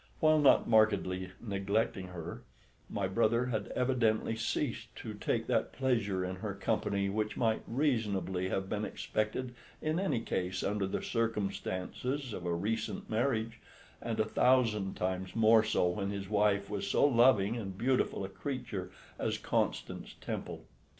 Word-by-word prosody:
While 155 0 +5
not 145 -2 +5
markedly 100 -5 +3
neglecting 100 -2 -1
her, 85 -1 -7 0.5
my 100 -2 -1
brother 115 +4 +2
had 110 -5 -2
evidently 115 -4 +1
ceased 115 0 -2
to - - -6
take - - -1
that - - 0
pleasure 110 -8 0
in 90 0 -4
her 100 0 -4
company 100 -1 0
which 105 +2 -2
might 110 -2 +1
reasonably 100 - 0
have 95 0 -1
been 105 +1 -2
expected 110 +4 -2 0.3
in 155 +2 0
any 170 -11 +1
case 90 -4 -2
under 100 -1 0
the 95 - -3
circumstances 115 +3 -2
of 90 -3 -5
a 85 - +1
recent 105 +3 -2
marriage, 115 -1 0 0.4
and 115 -1 -3
a 110 - +3
thousand 110 -4 +2
times 95 0 -2
more 110 0 +6
so 100 -4 +2
when 100 +2 -2
his 100 -1 -4
wife 100 -1 +2
was 100 -1 -3
so - - +4
loving 120 -5 +5
and 95 -5 -5
beautiful 125 -4 +1
a - - -7
creature 105 -5 -4 0.3
as - - 0
Constance - - -2
Temple. - - -5
105 Hz, 150 wpm, -32 LUFS, 95-115 Hz, 0.5 s, more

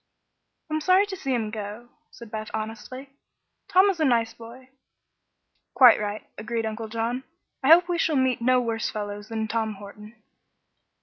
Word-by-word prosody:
"I'm 310 0 0
sorry 370 +5 +4
to 405 -2 -6
see 275 -7 -4
him 225 -4 -1
go," 215 +2 -7 0.2
said 235 -3 -13
Beth, 215 -1 -5
honestly. 225 +5 -7 0.6
"Tom 375 +2 +5
is 355 - -8
a - - +2
nice 230 -5 +2
boy." 240 +3 -13 1.1
"Quite 255 -3 +8
right," 210 0 -4
agreed 225 +1 -3
Uncle 220 0 -4
John. 230 +3 -3 0.4
"I 265 - -1
hope 340 +3 +7
we 350 -1 -1
shall 315 - +1
meet 260 -2 +1
no 255 +1 +4
worse 230 -2 -2
fellows 205 0 -6
than 220 -1 -2
Tom 220 -1 -2
Horton." 210 +2 -12
230 Hz, 165 wpm, -25 LUFS, 215-260 Hz, 1.1 s, Quite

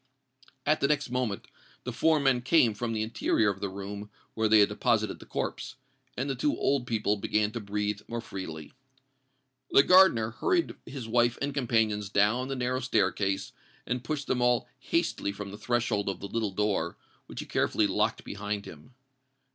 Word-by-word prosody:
At 155 +1 +2
the 140 - +4
next 145 -3 0
moment 125 -5 -2 0.4
the - - -4
four 160 -1 +3
men 135 -3 +2
came 125 -3 +4
from 115 +3 -3
the 110 -1 -1
interior 110 -1 +1
of 100 - -8
the 100 - -2
room 100 +2 -7 0.2
where 110 0 +1
they 110 0 +6
had 100 - +4
deposited 110 0 0
the - - -13
corpse; - - -4 0.4
and 130 +3 -1
the 135 - 0
two 135 +3 0
old 135 -3 +1
people 105 -2 0
began 105 +1 0
to 120 - -4
breathe 105 0 -2
more 120 0 -4
freely. 80 -8 -7 1.0
The 140 - +6
gardener 175 -13 +6
hurried 350 - 0
his 135 -5 -6
wife 120 +1 +2
and 140 0 -2
companions 110 -6 +1
down 105 +6 +2
the 135 - -3
narrow 125 0 -1
staircase, 100 -5 0 0.3
and 125 0 -2
pushed 150 -1 -3
them 125 - 0
all 125 -1 +2
hastily 100 - -1
from 100 0 -7
the 100 - -8
threshold 115 -3 0
of 95 - -4
the 100 - -6
little 110 0 -1
door, 95 -4 -1 0.3
which - - -8
he - - -8
carefully - - +1
locked - - 0
behind 105 0 -4
him. 80 - -13
110 Hz, 180 wpm, -28 LUFS, 105-125 Hz, 1.0 s, they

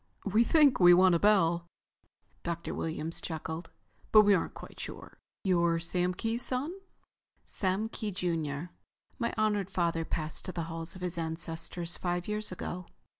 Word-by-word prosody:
"We 215 +4 +4
think 290 +1 +5
we 175 -1 +8
want 185 0 +6
a 170 - +3
bell," 175 -4 +3 0.7
Dr. 170 0 -3
Williams 160 0 -3
chuckled. 160 +1 -5 0.4
"But 215 -1 +9
we 205 -1 +5
aren't 180 - 0
quite - - -11
sure. - - -8 0.2
You're 170 -3 +3
Sam 180 +2 -1
Kee's 225 +4 -1
son?" 265 +8 -1 0.7
"Sam 195 +3 -1
Kee, 220 -1 -4
junior. 165 -4 -2 0.5
My 235 - 0
honored 210 -3 +1
father 170 -3 0
passed 155 -1 -3
to 185 - -3
the 170 -2 -3
halls 165 +1 -5
of 185 - -10
his 175 -1 -2
ancestors 165 +1 -2
five 175 0 -2
years 210 -1 -2
ago. 180 0 -5
175 Hz, 155 wpm, -31 LUFS, 165-205 Hz, 0.7 s, But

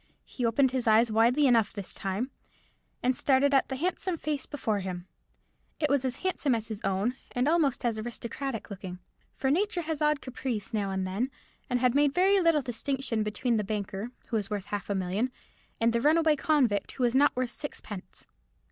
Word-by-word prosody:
He 245 -3 -2
opened 260 +3 +3
his 255 -3 -1
eyes 220 +1 +5
widely 235 +6 +4
enough 230 -5 +4
this 200 -3 -5
time, 200 +7 -2 0.7
and 255 +1 +3
started 280 +2 +3
at 270 - +3
the 265 - -2
handsome 360 +3 -1
face 300 -3 -3
before 225 -8 -1
him. 180 -2 -5 0.7
It 300 -3 +1
was 280 -2 +2
as 255 -1 -1
handsome 295 -8 +1
as 225 0 -4
his 215 -2 -5
own, 195 +6 0 0.2
and 250 +2 +1
almost 300 -6 +2
as 225 -2 0
aristocratic 235 +1 -5
looking. 185 -2 -6 0.3
For 265 - -1
Nature 370 +2 +1
has 315 -2 -3
odd 300 -1 +3
caprices 250 -6 -4
now 205 -3 0
and 190 -1 -1
then, 200 +8 -1 0.4
and 250 -1 +1
had 250 -2 +3
made 285 0 +3
very 390 +2 +5
little 330 -5 +3
distinction 250 -1 -2
between 215 +3 0
the 210 - 0
banker, 205 +1 -3 0.2
who 230 - +1
was 205 -2 -3
worth 205 -2 -3
half 205 0 -4
a 200 - 0
million, 190 +7 -1 0.5
and 230 0 +3
the 235 - +1
runaway 310 +2 +4
convict, 265 -9 +1
who 255 - -2
was 240 -1 +3
not 285 +2 +4
worth 250 -1 -1
sixpence. 205 -10 -8
245 Hz, 190 wpm, -29 LUFS, 215-280 Hz, 0.7 s, eyes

